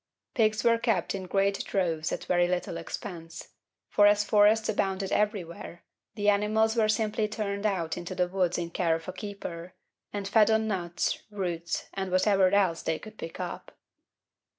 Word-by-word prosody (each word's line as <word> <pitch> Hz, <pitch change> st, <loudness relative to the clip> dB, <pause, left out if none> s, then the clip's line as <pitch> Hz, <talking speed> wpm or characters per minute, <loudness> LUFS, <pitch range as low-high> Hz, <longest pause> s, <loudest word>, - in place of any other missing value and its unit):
Pigs 215 Hz, -2 st, +2 dB
were 230 Hz, -1 st, +4 dB
kept 230 Hz, -1 st, 0 dB
in 190 Hz, -2 st, -5 dB
great 195 Hz, +1 st, +1 dB
droves 165 Hz, -5 st, -1 dB
at -, -, -3 dB
very 175 Hz, 0 st, +3 dB
little 175 Hz, -1 st, -2 dB
expense; 165 Hz, 0 st, -7 dB, 0.4 s
for 205 Hz, 0 st, +5 dB
as 205 Hz, 0 st, +4 dB
forests 215 Hz, +1 st, +4 dB
abounded 195 Hz, -2 st, -1 dB
everywhere, 180 Hz, -5 st, -2 dB, 0.3 s
the 205 Hz, -1 st, -2 dB
animals 215 Hz, +2 st, +3 dB
were 220 Hz, -2 st, +2 dB
simply 215 Hz, 0 st, +1 dB
turned 210 Hz, -1 st, -2 dB
out 175 Hz, -5 st, -1 dB
into 175 Hz, +1 st, -6 dB
the 180 Hz, 0 st, +1 dB
woods 180 Hz, -1 st, 0 dB
in 170 Hz, -1 st, -3 dB
care 170 Hz, -2 st, +1 dB
of 165 Hz, 0 st, -7 dB
a 185 Hz, -, -4 dB
keeper, 185 Hz, -4 st, -7 dB, 0.4 s
and 200 Hz, -1 st, -4 dB
fed 215 Hz, +1 st, +5 dB
on 220 Hz, 0 st, +2 dB
nuts, 175 Hz, -4 st, -1 dB
roots, 175 Hz, -5 st, -3 dB
and 190 Hz, -1 st, -3 dB
whatever 185 Hz, +1 st, +4 dB
else 185 Hz, -4 st, +2 dB
they 160 Hz, -, -1 dB
could 215 Hz, +4 st, -12 dB
pick 165 Hz, -, -7 dB
up. -, -, -6 dB
195 Hz, 170 wpm, -28 LUFS, 175-210 Hz, 0.4 s, for